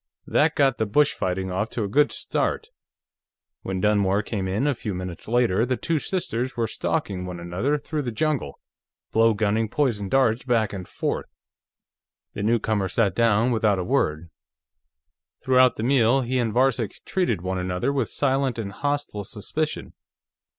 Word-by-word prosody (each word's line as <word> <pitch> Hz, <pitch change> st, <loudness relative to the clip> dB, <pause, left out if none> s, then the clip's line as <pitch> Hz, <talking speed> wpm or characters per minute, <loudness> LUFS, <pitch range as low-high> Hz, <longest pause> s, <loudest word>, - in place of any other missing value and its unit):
That 155 Hz, +1 st, +2 dB
got 135 Hz, -4 st, +2 dB
the 110 Hz, -, +1 dB
bush 145 Hz, +7 st, +3 dB
fighting 95 Hz, 0 st, -2 dB
off 105 Hz, +5 st, -1 dB
to 115 Hz, -, -3 dB
a -, -, -1 dB
good 145 Hz, +9 st, +3 dB
start. -, -, -2 dB, 0.9 s
When 95 Hz, -1 st, -3 dB
Dunmore 100 Hz, 0 st, +2 dB
came 100 Hz, -3 st, -3 dB
in, 100 Hz, +8 st, 0 dB
a 145 Hz, -, +2 dB
few 110 Hz, -5 st, -5 dB
minutes 90 Hz, -2 st, -7 dB
later, 115 Hz, -3 st, +2 dB
the 125 Hz, +1 st, 0 dB
two 165 Hz, -2 st, 0 dB
sisters 130 Hz, -9 st, -2 dB
were 115 Hz, -, +1 dB
stalking 105 Hz, -, -2 dB
one 90 Hz, -1 st, -6 dB
another 90 Hz, +13 st, -1 dB
through 150 Hz, +1 st, -3 dB
the 125 Hz, -4 st, -3 dB
jungle, 140 Hz, -, -1 dB, 0.5 s
blow 115 Hz, 0 st, +4 dB
gunning 110 Hz, +1 st, +1 dB
poison 110 Hz, -8 st, 0 dB
darts 125 Hz, -2 st, +3 dB
back 115 Hz, -5 st, +1 dB
and 95 Hz, -2 st, -6 dB
forth. -, -, -3 dB, 1.1 s
The -, -, -5 dB
newcomer 110 Hz, -2 st, +1 dB
sat 100 Hz, +1 st, +1 dB
down 115 Hz, +1 st, +3 dB
without 110 Hz, -3 st, +2 dB
a 90 Hz, -, -1 dB
word; 85 Hz, -, 0 dB, 1.1 s
throughout 130 Hz, -1 st, +4 dB
the 110 Hz, -, -4 dB
meal, 130 Hz, 0 st, +3 dB
he 130 Hz, +1 st, -1 dB
and 115 Hz, -2 st, 0 dB
Varcek 125 Hz, -2 st, 0 dB
treated 120 Hz, -, 0 dB
one 95 Hz, 0 st, -2 dB
another 90 Hz, +9 st, -1 dB
with 135 Hz, -6 st, 0 dB
silent 135 Hz, -3 st, 0 dB
and 105 Hz, -3 st, -4 dB
hostile 145 Hz, -3 st, -2 dB
suspicion. 135 Hz, +9 st, -3 dB
115 Hz, 165 wpm, -24 LUFS, 100-130 Hz, 1.1 s, blow